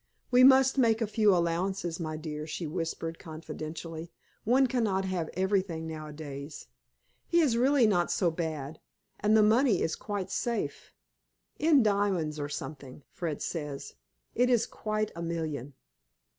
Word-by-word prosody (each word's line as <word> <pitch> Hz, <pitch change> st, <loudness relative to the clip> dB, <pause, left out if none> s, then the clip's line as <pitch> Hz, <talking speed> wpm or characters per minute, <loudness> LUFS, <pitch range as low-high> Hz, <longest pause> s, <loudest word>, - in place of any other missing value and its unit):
"We 250 Hz, 0 st, +6 dB
must 265 Hz, +1 st, +6 dB
make 225 Hz, -3 st, +4 dB
a 225 Hz, -, +1 dB
few 215 Hz, -1 st, +3 dB
allowances, 175 Hz, 0 st, 0 dB
my 155 Hz, -2 st, -3 dB
dear," 155 Hz, -1 st, -5 dB
she 165 Hz, +2 st, -4 dB
whispered, 165 Hz, 0 st, -4 dB
confidentially. 160 Hz, +1 st, -7 dB, 0.3 s
"One 255 Hz, +4 st, +4 dB
cannot 220 Hz, -7 st, 0 dB
have 180 Hz, -4 st, -2 dB
everything 185 Hz, -3 st, 0 dB
nowadays. 150 Hz, -2 st, -7 dB, 0.6 s
He 340 Hz, -, +3 dB
is 285 Hz, -8 st, +3 dB
really 260 Hz, +1 st, +4 dB
not 180 Hz, -5 st, +2 dB
so 175 Hz, -4 st, +2 dB
bad, 160 Hz, -2 st, -4 dB, 0.4 s
and 215 Hz, +2 st, +4 dB
the 215 Hz, -, +6 dB
money 220 Hz, -1 st, +4 dB
is 160 Hz, -, -1 dB
quite 205 Hz, -3 st, -4 dB
safe. 235 Hz, -1 st, -3 dB, 0.7 s
In 300 Hz, -5 st, +5 dB
diamonds, 195 Hz, -7 st, +1 dB
or 145 Hz, 0 st, -3 dB
something, 145 Hz, -2 st, -7 dB
Fred 165 Hz, -4 st, -4 dB
says. 150 Hz, -4 st, -5 dB, 0.4 s
It 250 Hz, +1 st, +2 dB
is 240 Hz, -3 st, +3 dB
quite 215 Hz, 0 st, -3 dB
a 170 Hz, -, -6 dB
million." 155 Hz, -5 st, -4 dB
175 Hz, 145 wpm, -29 LUFS, 155-220 Hz, 0.7 s, We